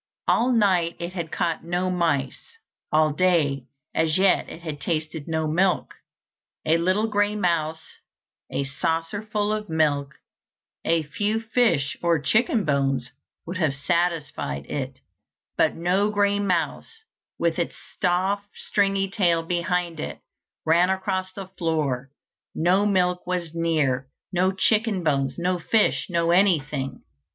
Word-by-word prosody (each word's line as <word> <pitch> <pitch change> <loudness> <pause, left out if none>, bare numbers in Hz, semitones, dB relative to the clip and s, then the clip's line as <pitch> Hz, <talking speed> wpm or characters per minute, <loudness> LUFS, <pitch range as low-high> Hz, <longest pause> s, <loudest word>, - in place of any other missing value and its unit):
All 245 +3 +3
night 185 -7 +3
it 170 +1 -5
had 170 -4 -4
caught 170 -2 -1
no 175 +2 -1
mice; 165 - -1 0.3
all 155 -1 +3
day 150 -6 +2 0.3
as 160 0 +2
yet 190 0 +3
it 165 - -10
had 150 -3 -5
tasted 155 -2 -2
no 160 -1 0
milk. 180 +4 +1 0.7
A 160 +1 +4
little 185 +5 +2
grey 205 -1 +1
mouse, 160 -5 -1 0.5
a 140 - -1
saucerful 165 +10 -1
of 215 -1 -4
milk, 145 -3 +1 0.7
a 165 -1 +2
few 205 +8 -1
fish 225 - +1
or 170 -1 +3
chicken 215 - +2
bones, 135 -4 0 0.3
would 175 +2 -4
have 155 -6 +1
satisfied 145 - -1
it; 135 - -5 0.5
but - - +2
no 185 +5 +1
grey 205 -1 +2
mouse, 200 - -1 0.3
with 170 0 0
its 170 - -2 0.2
soft 190 +3 +1
stringy 195 -1 +1
tail 180 -5 +2
behind 175 -1 -1
it, - - -5 0.5
ran 170 +3 +4
across 190 0 -1
the 195 +1 -7
floor; 145 -6 -1 0.5
no 185 +5 +3
milk 180 -3 +1
was 175 -3 -2
near, 150 -6 0 0.3
no 185 +1 +3
chicken 210 0 +1
bones, 135 -4 0
no 180 +1 0
fish, 215 +5 +2
no 170 -1 +1
anything. 150 -8 +1
170 Hz, 130 wpm, -24 LUFS, 155-195 Hz, 0.7 s, A